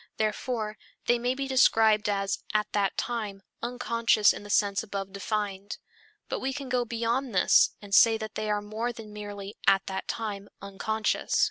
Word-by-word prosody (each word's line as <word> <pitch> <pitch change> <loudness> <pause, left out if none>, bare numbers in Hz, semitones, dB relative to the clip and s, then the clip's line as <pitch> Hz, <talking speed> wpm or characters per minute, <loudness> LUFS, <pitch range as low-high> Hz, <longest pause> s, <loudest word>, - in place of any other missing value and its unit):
Therefore, 215 0 -2 0.3
they 240 0 +3
may 245 +2 0
be 275 0 -3
described 220 -5 +4
as 195 -1 0 0.2
"at 210 0 +3
that 200 -2 +1
time" 210 -5 -3 0.2
unconscious 230 -3 +2
in - - -8
the 205 - -11
sense 200 -1 +2
above 195 -2 -5
defined. 200 0 -3 0.5
But - - -3
we 265 +1 -2
can 275 -1 -6
go 245 -1 +1
beyond 235 +1 -1
this 180 - +6
and 200 -1 -9
say 225 +2 +7
that 220 -1 -6
they 215 0 -3
are 210 0 0
more 220 +3 -3
than 225 -3 -10
merely 205 -1 -7
"at 195 0 +5
that 190 0 -4
time" 205 -3 -4
unconscious. 210 +2 -1
215 Hz, 170 wpm, -28 LUFS, 200-235 Hz, 0.5 s, say